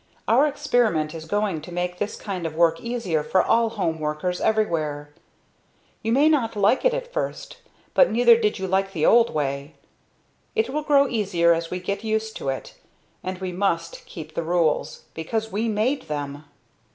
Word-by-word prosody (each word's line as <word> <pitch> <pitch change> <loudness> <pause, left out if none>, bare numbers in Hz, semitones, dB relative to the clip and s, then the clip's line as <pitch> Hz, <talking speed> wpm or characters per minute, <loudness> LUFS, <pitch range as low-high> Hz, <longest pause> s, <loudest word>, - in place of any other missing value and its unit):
"Our 270 +6 +5
experiment 220 - +1
is 160 -1 -7
going 200 -2 -1
to 165 - -10
make 180 +1 -3
this 205 - -2
kind 185 -5 -4
of 155 - -8
work 165 0 +3
easier 230 -10 -1
for 185 - +2
all 230 0 +3
home 180 -8 -2
workers 155 +4 -2
everywhere. 155 -9 0 0.9
You 225 - -1
may 280 +6 +4
not 255 -8 +2
like 205 +5 +3
it - - +3
at - - -6
first, - - -4 0.4
but 270 - +5
neither 235 +1 +6
did 215 -2 0
you 190 - -3
like 195 +1 0
the 160 -3 0
old 235 0 +5
way. 140 -1 -3 0.8
It 225 +3 +1
will 300 +2 -1
grow 285 -2 +4
easier 185 -8 +2
as 165 0 -3
we 180 - -3
get 200 +3 -4
used 220 0 -1
to 135 - -3
it; 135 - -6 0.4
and 185 0 -4
we 185 0 -4
must 170 -3 -1
keep 155 -1 -9
the - - -2
rules, 165 -2 0
because 220 +7 -3
we 220 +4 -1
made 220 - 0
them!" 145 0 -5
190 Hz, 180 wpm, -24 LUFS, 160-225 Hz, 0.9 s, neither